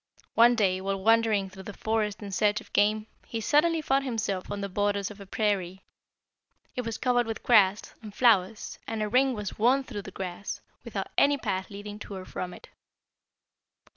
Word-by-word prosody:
One 240 +1 +6
day, 190 -4 +2
while 195 0 -2
wandering 225 -3 +3
through 190 0 -10
the - - -6
forest 215 -1 -1
in 200 - -6
search 210 +2 +2
of - - -16
game, 215 +1 +3 0.2
he 230 - -3
suddenly 310 +7 +2
found 270 -1 +2
himself 215 -7 -2
on 200 0 -4
the 200 - -2
borders 205 +1 -1
of 205 - -12
a 200 - -10
prairie. 195 -3 -1 0.9
It 250 - -1
was 230 -2 -4
covered 245 -2 +2
with 225 0 -5
grass, 205 -4 +4
and 215 -2 -9
flowers, 215 -2 +2
and 220 -1 -2
a - - -1
ring 255 +3 +3
was 210 -1 -5
worn 255 +5 +4
through 225 -6 -6
the 200 - -9
grass, 190 +1 -5 0.2
without - - -4
any 285 0 +4
path 190 -7 -3
leading 205 0 -8
to 205 - -8
or 185 -1 -7
from 180 -1 -5
it. - - -13
210 Hz, 190 wpm, -28 LUFS, 195-230 Hz, 0.9 s, One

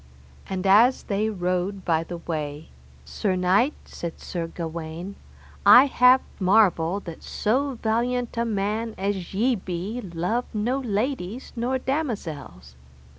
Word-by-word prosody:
And 190 0 -3
as 225 +7 +5
they 210 +2 -1
rode 185 0 -2
by 165 -2 +2
the 175 +1 -7
way, 155 -2 -5 0.4
Sir 190 - -1
knight, 190 +10 +2
said 170 -1 -7
Sir 170 -2 -4
Gawaine, 165 +3 -6 0.5
I 255 - +9
have 255 -1 +5 0.2
marvel 190 -2 +3
that 170 -4 -9
so 265 +5 -1
valiant 240 +2 0
a 235 - +1
man 215 +1 -2
as 195 -2 -3
ye 245 +6 +3
be 190 +4 -4
love 185 +6 -2
no 240 +6 0
ladies 235 -1 -3
nor 245 +3 0
damosels. 200 - -4
200 Hz, 125 wpm, -25 LUFS, 175-240 Hz, 0.5 s, I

